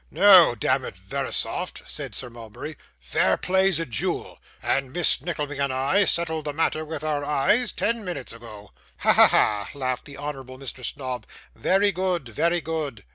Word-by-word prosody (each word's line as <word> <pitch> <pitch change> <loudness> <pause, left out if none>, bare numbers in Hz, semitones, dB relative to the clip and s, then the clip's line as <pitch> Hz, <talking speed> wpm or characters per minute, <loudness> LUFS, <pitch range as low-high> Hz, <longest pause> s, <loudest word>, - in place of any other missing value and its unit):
'No, 190 -9 +7
damn 105 - +1
it, - - -7
Verisopht,' - - -2
said - - -4
Sir 125 - -5
Mulberry, 120 +6 -9 0.2
'fair - - +1
play's 190 -2 +2
a 165 - -2
jewel, 115 -8 -3 0.2
and 135 -1 0
Miss 175 +3 +3
Nickleby 150 -4 -4
and 140 -1 0
I 140 +10 +2
settled 160 -3 0
the 145 - -3
matter 155 0 0
with 155 -1 -6
our 150 -2 -1
eyes 185 - +2
ten 225 +4 -1
minutes 175 - -5
ago.' 110 -3 -12 0.3
'Ha, - - +5
ha, - - +8
ha!' 105 -1 +2
laughed 130 -3 -3
the 140 -1 -10
honourable 135 -3 -7
Mr. 130 -1 -8
Snobb, 130 -1 -3 0.3
'very 200 +2 +2
good, 180 -6 -2
very 170 +10 0
good. 155 -10 -4
150 Hz, 170 wpm, -24 LUFS, 130-175 Hz, 0.3 s, ha